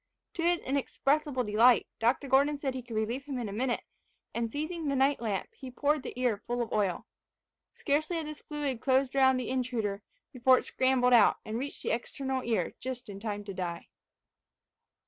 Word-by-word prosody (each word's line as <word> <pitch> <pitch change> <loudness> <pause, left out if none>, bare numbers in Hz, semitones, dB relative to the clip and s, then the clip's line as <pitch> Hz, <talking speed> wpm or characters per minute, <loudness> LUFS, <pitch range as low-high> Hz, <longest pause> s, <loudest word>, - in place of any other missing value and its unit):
To 340 - -4
his 345 +1 +3
inexpressible 280 0 0
delight 230 +3 +5
Dr. 245 +5 +1
Gordon 280 +3 +3
said 275 -2 -2
he 260 - -4
could 235 -2 -8
relieve 230 +5 -1
him 280 -3 -4
in 240 -3 -3
a - - -5
minute; 245 +3 -1 0.5
and 230 -1 -2
seizing 310 +3 -3
the 280 - +1
night 270 0 +2
lamp 210 -5 -2
he 260 - -9
poured 290 +3 +1
the 250 - -7
ear 235 -5 +1
full 240 0 0
of 230 - -8
oil. 200 -5 0 0.7
Scarcely 310 +3 0
had 325 - -3
this 300 0 -8
fluid 285 -6 -3
closed 265 0 +2
around 265 -1 +5
the 255 -2 -3
intruder, 235 -6 -1 0.3
before 255 0 +5
it - - -3
scrambled 255 -1 +2
out, 225 -4 +6
and 220 +2 -3
reached 280 +2 -6
the - - -1
external 265 +3 -2
ear 220 -8 0
just 250 -3 -6
in 195 -1 -7
time 205 -1 -4
to 200 -1 -7
die. 175 -2 -5
255 Hz, 190 wpm, -30 LUFS, 225-275 Hz, 0.7 s, out